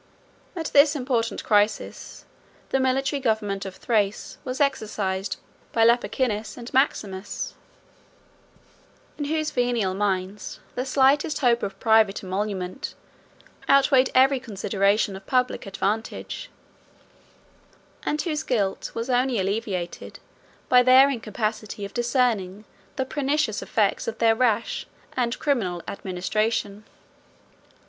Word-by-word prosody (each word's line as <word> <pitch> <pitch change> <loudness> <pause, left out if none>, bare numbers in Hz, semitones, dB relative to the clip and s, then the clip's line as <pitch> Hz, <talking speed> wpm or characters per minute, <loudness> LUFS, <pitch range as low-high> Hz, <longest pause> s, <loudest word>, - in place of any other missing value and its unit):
At 330 -2 -4
this 285 +1 +6
important 250 -4 -1
crisis, 210 0 0 0.4
the 270 - +1
military 270 +2 +1
government 210 -5 -1
of 190 - -8
Thrace 210 -3 -1
was 255 -2 -4
exercised 210 -8 -1 0.4
by 225 -1 +4
Lupicinus 235 -2 +1
and 240 0 -9
Maximus, 205 -7 -1 1.7
in 290 - -1
whose 310 0 -1
venal 240 -6 0
minds 195 0 -2
the 250 +2 -3
slightest 275 +3 +3
hope 240 -2 +3
of 195 -1 -5
private 220 -3 +3
emolument 190 +2 -3 0.7
outweighed 270 -1 +5
every 265 +1 +5
consideration 200 -3 0
of 195 0 -11
public 255 -5 0
advantage; 220 - -3 1.5
and 300 - -2
whose 310 -4 -1
guilt 210 -10 -1
was 230 +1 -3
only 250 -1 +1
alleviated 195 -3 -3 0.5
by 250 -1 +6
their 260 +2 +7
incapacity 215 -3 -3
of 200 - -9
discerning 235 -5 0 0.3
the 265 - -1
pernicious 285 -4 0
effects 210 -3 0
of 225 -1 -3
their 225 -1 +4
rash 230 -1 0 0.3
and 240 -2 -1
criminal 195 - -1
administration. 205 +2 -2
225 Hz, 110 wpm, -25 LUFS, 200-260 Hz, 1.7 s, their